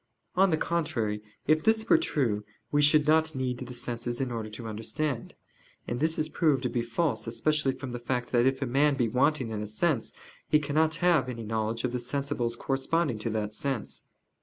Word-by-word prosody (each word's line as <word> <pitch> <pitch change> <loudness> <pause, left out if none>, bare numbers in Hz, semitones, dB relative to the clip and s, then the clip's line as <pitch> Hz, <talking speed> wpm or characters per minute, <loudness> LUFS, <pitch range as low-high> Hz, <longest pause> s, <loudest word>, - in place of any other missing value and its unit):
On 195 +1 +5
the 160 - +2
contrary, 115 -12 -1 0.2
If 155 +1 +3
this 220 0 +2
were 330 - +6
true 120 - 0 0.3
we 145 - +3
should 150 +1 +5
not 160 0 +3
need 130 -2 -2
the 125 -1 -7
senses 120 -1 -4
in 130 -2 -1
order 110 -2 -4
to 110 +2 -7
understand. 115 +5 -3 0.5
And 120 - -2
this 160 +2 +1
is 155 - +1
proved 150 -4 +1
to 125 - 0
be 120 - -1
false 120 +1 -1
especially 135 +4 +1
from 130 -1 -7
the 120 - -4
fact 125 0 -2
that 120 0 +4
if 135 +1 0
a - - 0
man 140 +3 +3
be 125 -4 +1
wanting 130 0 +1
in 105 -1 -3
a 105 - -4
sense, 125 +3 0 0.4
he 150 - +5
cannot 155 +2 +1
have 160 -8 +4
any 115 -2 -5
knowledge 110 +1 -2
of 125 - 0
the 125 - -2
sensibles 125 -2 -2
corresponding 135 -1 0
to 110 - -2
that 105 -1 -2
sense. 135 -3 -3
130 Hz, 205 wpm, -28 LUFS, 115-150 Hz, 0.5 s, were